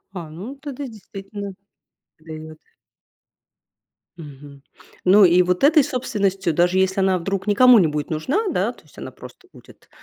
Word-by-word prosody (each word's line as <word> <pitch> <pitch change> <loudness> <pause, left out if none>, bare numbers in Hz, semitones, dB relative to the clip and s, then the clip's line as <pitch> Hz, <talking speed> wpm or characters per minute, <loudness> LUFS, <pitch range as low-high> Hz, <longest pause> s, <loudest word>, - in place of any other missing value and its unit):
А, 170 -4 -7
ну 195 - -9
тогда 280 -1 -7
действительно 200 -3 -9 0.7
даёт. 155 0 -10 1.6
Мгм. 145 -2 -12 0.4
Ну 195 +2 +6
и 180 +1 +5
вот 180 +5 -1
этой 305 +1 +5
собственностью, 200 - -2
даже 175 +3 +1
если 190 +1 +1
она 190 -1 +2
вдруг 195 +3 -4
никому 245 +3 +6
не 175 - +3
будет 150 0 -4
нужна, 270 - -1
да, - - -1
то - - -22
есть - - -23
она - - -8
просто 375 - -15
будет - - -19
190 Hz, 150 wpm, -21 LUFS, 165-220 Hz, 1.6 s, Ну